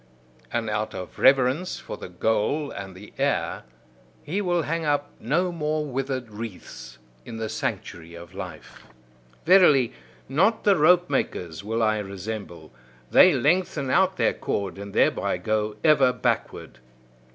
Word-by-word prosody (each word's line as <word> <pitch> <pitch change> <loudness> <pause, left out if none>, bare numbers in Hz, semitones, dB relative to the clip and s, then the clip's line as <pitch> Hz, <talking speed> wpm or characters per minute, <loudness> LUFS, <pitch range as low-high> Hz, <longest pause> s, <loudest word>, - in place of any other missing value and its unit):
And 115 -1 -2
out 110 0 -2
of 90 -1 -8
reverence 135 +6 +3
for - - -7
the - - -9
goal 110 - 0
and 95 -2 -8
the 100 +3 -13
heir, - - -1 0.6
he 180 +8 -2
will 175 -3 0
hang 165 +2 -2
up 145 -1 0
no 170 +10 0
more 155 -2 -2
withered 130 -3 -4
wreaths 105 -2 -9 0.3
in 115 - -8
the 110 0 -3
sanctuary 85 -5 -5
of 85 +1 -12
life. 90 -4 -9 0.6
Verily, 155 -9 +5 0.3
not 195 +10 +2
the 200 -2 +5
rope 175 +2 +4
makers 85 - -3
will 115 +2 -1
I 110 -1 +2
resemble: 100 -4 -7 0.4
they - - +7
lengthen 150 -4 +1
out 190 +5 +3
their - - +2
cord, 100 -1 -3
and 100 0 -7
thereby - - +2
go 110 -1 -1
ever 150 -5 +5
backward. 125 - -3
125 Hz, 140 wpm, -25 LUFS, 105-155 Hz, 0.6 s, they